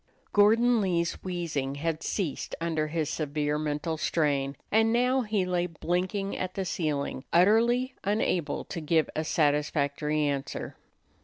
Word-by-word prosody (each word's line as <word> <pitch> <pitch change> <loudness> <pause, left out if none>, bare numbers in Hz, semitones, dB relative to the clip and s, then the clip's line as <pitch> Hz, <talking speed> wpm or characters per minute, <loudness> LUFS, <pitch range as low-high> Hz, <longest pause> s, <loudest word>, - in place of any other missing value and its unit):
Gordon 225 +3 +5
Lee's 170 -3 +1
wheezing 165 -7 -2
had 160 +2 -2
ceased 170 -4 -3
under 160 -2 -1
his 155 -1 -1
severe 150 -1 -1
mental 155 +2 -2
strain, 140 -4 0
and 225 +1 +4
now 250 +3 +3
he 210 -5 0
lay 180 -1 0
blinking 180 +4 -2
at 185 0 -4
the 195 - -2
ceiling, 150 -6 -2
utterly 235 +8 +4
unable 185 -6 0
to 170 - -5
give 160 +1 +1
a 155 - 0
satisfactory 150 0 +1
answer. 140 -2 -3
165 Hz, 135 wpm, -28 LUFS, 150-195 Hz, -, Gordon